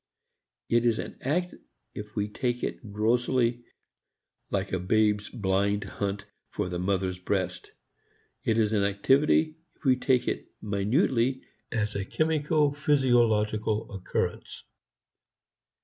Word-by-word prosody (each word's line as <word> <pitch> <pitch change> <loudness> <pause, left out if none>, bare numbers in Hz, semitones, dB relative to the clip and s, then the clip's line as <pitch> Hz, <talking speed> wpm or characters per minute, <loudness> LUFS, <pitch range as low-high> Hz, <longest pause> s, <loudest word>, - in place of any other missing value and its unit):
It 120 0 +3
is 115 -2 +3
an - - -6
act 175 +7 0 0.4
if 105 0 -8
we 105 -1 0
take 120 +3 -2
it 110 - -4
grossly, 120 +3 +1 0.9
like 100 -1 -2
a 95 - +1
babe's 105 +2 +2
blind 100 -2 0
hunt 100 0 -4 0.2
for 90 - -3
the 90 -1 -3
mother's 95 -1 -1
breast; 95 0 -2 0.7
it 110 - +1
is 110 -1 +2
an 100 -2 +2
activity 140 +10 +3 0.2
if - - -31
we 130 -1 +5
take 125 -1 +1
it - - -2
minutely 115 - +1 0.3
as 110 -2 -1
a 100 - -2
chemico 155 +3 +1
physiological 115 -7 +2
occurrence. 95 -2 -3
110 Hz, 120 wpm, -28 LUFS, 100-130 Hz, 0.9 s, we